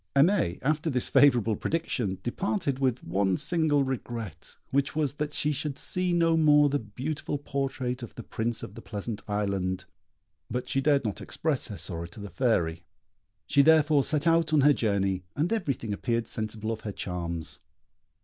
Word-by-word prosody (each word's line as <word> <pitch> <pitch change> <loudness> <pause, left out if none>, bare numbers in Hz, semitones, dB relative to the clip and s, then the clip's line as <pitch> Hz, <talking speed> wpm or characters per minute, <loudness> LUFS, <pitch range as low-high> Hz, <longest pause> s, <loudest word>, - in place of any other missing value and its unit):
Aimée, 140 - +3
after 155 +3 +1
this 125 -4 -1
favourable 120 -6 +5
prediction, 120 - -1
departed 145 - -1
with 130 -2 0
one 95 +1 +1
single 155 -5 +2
regret, 120 -7 -5
which 140 +1 +1
was 150 -4 +1
that 150 0 -3
she 150 0 0
should 145 -1 -3
see 180 0 -1
no 165 -1 +3
more 150 -2 +5
the 145 +1 +1
beautiful 130 +8 -4
portrait 135 -3 -3
of 120 - -8
the 120 - -7
Prince 115 +1 -3
of 100 - -7
the - - -9
Pleasant 105 0 -5
Island; 95 -3 -1 0.6
but 125 0 -3
she 135 - 0
dared 140 -2 +3
not 105 - -3
express 155 -5 -1
her 105 - -7
sorrow 85 0 -5
to 85 - -13
the 100 -1 -7
Fairy. 85 -6 +1 0.6
She 140 - +4
therefore 155 -1 +5
set 150 +1 0
out 165 -1 +3
on 155 -2 +5
her 145 +2 +6
journey, 100 -6 0
and 155 +8 +1
everything 135 - -2
appeared 115 +2 -1
sensible 110 0 -3
of 110 - -4
her 105 - -4
charms. 85 -4 -4
130 Hz, 170 wpm, -28 LUFS, 105-150 Hz, 0.6 s, her